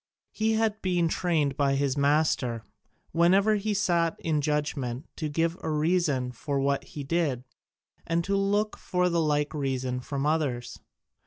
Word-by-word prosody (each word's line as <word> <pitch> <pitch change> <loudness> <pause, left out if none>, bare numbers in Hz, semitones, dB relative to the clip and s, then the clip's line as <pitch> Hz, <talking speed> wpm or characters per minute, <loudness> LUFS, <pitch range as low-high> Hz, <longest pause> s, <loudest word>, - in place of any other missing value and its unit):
He 220 +1 0
had 220 -1 0
been 175 -2 +1
trained 155 -6 0
by 140 -1 +2
his 140 -1 0
master, 140 -5 +1 0.5
whenever 195 +6 +4
he 210 +1 -1
sat 170 -4 +1
in 155 -2 0
judgment, 145 -3 -2
to 155 -3 -2
give 165 +3 0
a - - -3
reason 150 -5 +1
for 140 +2 -3
what 140 0 +1
he 145 - -7
did, 140 -4 0 0.6
and 170 0 +1
to 200 +3 0
look 205 +2 +1
for 180 0 0
the 170 -1 +1
like 150 -1 0
reason 130 -3 -2
from 140 +2 -3
others. 145 -6 -1
155 Hz, 155 wpm, -27 LUFS, 140-175 Hz, 0.6 s, whenever